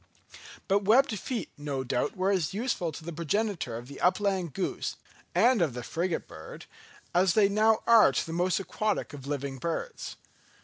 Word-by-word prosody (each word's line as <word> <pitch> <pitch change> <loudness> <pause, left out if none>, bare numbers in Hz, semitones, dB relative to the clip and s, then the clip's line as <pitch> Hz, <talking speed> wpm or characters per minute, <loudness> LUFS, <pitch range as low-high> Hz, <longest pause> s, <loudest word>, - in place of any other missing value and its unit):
But 200 +1 +2
webbed 225 +1 +4
feet 230 -4 -4
no 140 -2 -3
doubt 125 +5 -1
were 190 +2 +2
as 185 -2 0
useful 210 -7 -1
to 155 - -9
the 170 - -5
progenitor 170 - -1
of 120 +1 -9
the 140 - -10
upland 185 -4 +1
goose 190 - -2 0.4
and 245 -4 +4
of 150 -8 +1
the 125 - -5
frigate 170 +6 -2
bird, 80 - -10 0.5
as 180 0 +3
they 210 -2 +6
now 215 +2 +3
are 230 -9 +7
to 130 - -1
the 165 - -6
most 180 +2 +1
aquatic 210 -2 -2
of 140 -2 -9
living 140 -2 -3
birds. 305 - -4
180 Hz, 175 wpm, -29 LUFS, 145-210 Hz, 0.5 s, are